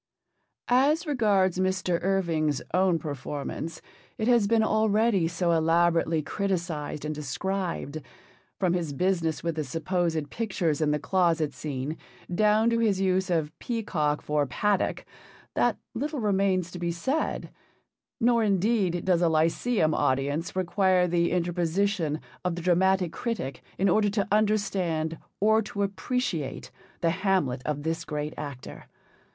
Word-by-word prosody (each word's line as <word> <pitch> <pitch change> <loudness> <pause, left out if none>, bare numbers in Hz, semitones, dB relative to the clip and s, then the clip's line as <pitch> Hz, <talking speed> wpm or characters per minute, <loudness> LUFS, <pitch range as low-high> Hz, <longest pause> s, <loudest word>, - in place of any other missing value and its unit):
As 285 +7 +3
regards 205 - +2
Mr. 185 -2 0
Irving's 170 -6 +1
own 185 -2 +3
performance, 150 +2 -5 0.3
it 220 - -1
has 235 -4 +4
been 225 0 +3
already 215 -4 +2
so 170 +1 0
elaborately 165 -1 +2
criticised 170 -6 -3
and 155 - -2
described, 155 +1 -3 0.6
from 185 -3 +1
his 165 -5 -2
business 170 0 0
with 170 -1 0
the 155 - 0
supposed 160 +1 -1
pictures 180 -9 -1
in 155 - +2
the 150 - +2
closet 165 0 +1
scene 145 +1 -4 0.4
down 215 +4 +3
to 230 - +1
his 210 -4 +2
use 190 0 +1
of 160 -4 0
'peacock' 170 -11 -1
for 150 -1 0
'paddock,' 200 +10 0 0.5
that - - +2 0.2
little 295 0 -3
remains 195 -4 +1
to 180 - -7
be 170 0 -1
said; 260 - -2 0.7
nor, 235 -1 +3
indeed, 195 -3 +1
does 180 -2 +3
a 170 - +4
Lyceum 160 +3 +2
audience 145 +7 0
require 185 0 +2
the 170 0 +2
interposition 175 -1 0 0.2
of 180 -2 -1
the 175 - -6
dramatic 185 0 +3
critic 210 - -4 0.2
in 195 - +2
order 205 +3 +3
to 200 -2 -1
understand 195 -7 +1 0.2
or 220 +2 +4
to 205 -1 -3
appreciate 195 - -2 0.3
the 165 -2 +3
Hamlet 185 -9 0
of 145 -1 -2
this 165 +1 -2
great 150 -1 -4
actor. 140 -4 -8
180 Hz, 135 wpm, -27 LUFS, 160-200 Hz, 0.7 s, has